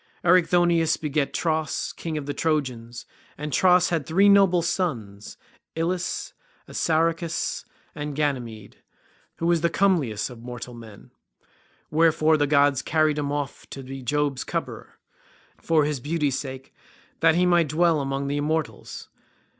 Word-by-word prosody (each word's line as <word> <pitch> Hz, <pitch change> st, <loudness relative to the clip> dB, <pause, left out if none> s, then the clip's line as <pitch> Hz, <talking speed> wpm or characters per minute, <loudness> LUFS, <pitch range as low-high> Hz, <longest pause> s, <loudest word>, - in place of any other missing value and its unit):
Erichthonius 175 Hz, -2 st, +3 dB
begat 150 Hz, -2 st, -1 dB
Tros, 160 Hz, -2 st, -2 dB
king 160 Hz, -2 st, -4 dB
of 145 Hz, -, -4 dB
the 145 Hz, -, -3 dB
Trojans, 125 Hz, -8 st, -2 dB, 0.3 s
and 150 Hz, -1 st, -5 dB
Tros 180 Hz, +3 st, +4 dB
had 165 Hz, -4 st, 0 dB
three 195 Hz, +5 st, +4 dB
noble 195 Hz, -4 st, +5 dB
sons, 115 Hz, -, -3 dB, 0.4 s
Ilus, 175 Hz, +3 st, -2 dB, 0.3 s
Assaracus, 165 Hz, 0 st, -1 dB, 0.3 s
and 145 Hz, -1 st, -5 dB
Ganymede 120 Hz, -8 st, -3 dB, 0.6 s
who 165 Hz, -, -4 dB
was 170 Hz, -1 st, +2 dB
comeliest 165 Hz, -, +1 dB
of 120 Hz, -2 st, -12 dB
mortal 120 Hz, 0 st, -8 dB
men; 110 Hz, -4 st, -13 dB, 0.8 s
wherefore 160 Hz, 0 st, +3 dB
the 145 Hz, -1 st, +1 dB
gods 140 Hz, -2 st, +3 dB
carried 155 Hz, 0 st, +1 dB
him 140 Hz, -1 st, -2 dB
off 145 Hz, -1 st, -5 dB
to 135 Hz, -, -8 dB
be 135 Hz, +1 st, -8 dB
Jove's 145 Hz, +1 st, -1 dB
cup -, -, -2 dB
bearer, -, -, -12 dB, 0.6 s
for 160 Hz, -3 st, +2 dB
his 150 Hz, -2 st, -2 dB
beauty's 145 Hz, 0 st, -1 dB
sake, 135 Hz, -1 st, -8 dB, 0.5 s
that 165 Hz, 0 st, +4 dB
he 180 Hz, +1 st, +3 dB
might 175 Hz, -3 st, +3 dB
dwell 165 Hz, +1 st, +2 dB
among 135 Hz, 0 st, -2 dB
the 145 Hz, +1 st, -1 dB
immortals. 155 Hz, +1 st, -3 dB
150 Hz, 140 wpm, -24 LUFS, 135-165 Hz, 0.8 s, noble